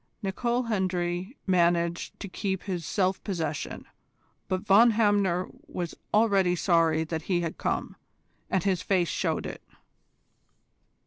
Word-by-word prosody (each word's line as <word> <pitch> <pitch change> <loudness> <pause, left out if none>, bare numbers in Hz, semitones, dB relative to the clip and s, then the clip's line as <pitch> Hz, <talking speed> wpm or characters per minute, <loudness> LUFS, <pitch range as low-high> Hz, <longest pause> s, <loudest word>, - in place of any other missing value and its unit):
Nicol 235 +6 0
Hendry 185 0 -2
managed 170 -2 +1
to - - -4
keep 190 0 -3
his 180 -5 -4
self 190 -1 0
possession, 160 -7 -3 0.6
but 185 -1 -1
Von 210 +4 +6
Hamner 205 -5 +2 0.2
was 175 - -4 0.2
already 200 -5 +3
sorry 165 -3 +3
that 160 0 -3
he 175 -2 +2
had 165 -1 -4
come, - - -2 0.5
and 190 -3 +1
his 190 -3 +1
face 180 -5 +1
showed - - -1
it. - - -6
185 Hz, 125 wpm, -27 LUFS, 170-200 Hz, 0.6 s, Von